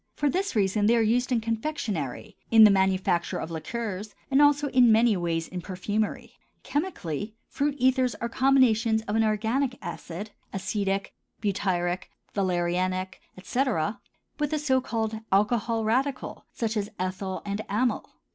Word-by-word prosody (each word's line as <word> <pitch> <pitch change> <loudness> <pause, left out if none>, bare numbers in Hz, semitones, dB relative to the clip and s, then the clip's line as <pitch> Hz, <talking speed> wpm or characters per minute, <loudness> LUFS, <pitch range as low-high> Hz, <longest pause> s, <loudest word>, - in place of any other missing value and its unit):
For 290 -2 +1
this 385 -4 -1
reason 205 0 +2
they 235 - +5
are 230 - +3
used 245 +4 +1
in 235 -2 +2
confectionery, 220 - -3
in 225 -1 +8
the 210 - +9
manufacture 190 -2 +1
of 160 - -5
liqueurs, 210 +3 -5 0.2
and 275 +2 +5
also 290 0 +4
in 250 -3 +5
many 225 0 +5
ways 165 -2 -1
in 180 -1 -6
perfumery. 205 +4 -3 0.2
Chemically, 220 - -3
fruit 285 0 -1
ethers 255 -1 +2
are 235 - -3
combinations 235 -4 +3
of 210 0 -3
an 225 - +3
organic 225 +5 0
acid—acetic, 195 +2 -4 0.3
butyric, 185 -3 -1 0.2
valerianic, 185 0 -1 0.2
etc.—with 230 - -2
a 310 - +1
so 265 -3 +2
called 220 -3 -2
alcohol 225 +3 +2
radicle 260 +4 -1
such 230 -1 -2
as 205 -1 -1
ethyl 185 +1 -3
and 200 +1 -2
amyl. 225 +3 0
215 Hz, 135 wpm, -27 LUFS, 190-250 Hz, 0.3 s, the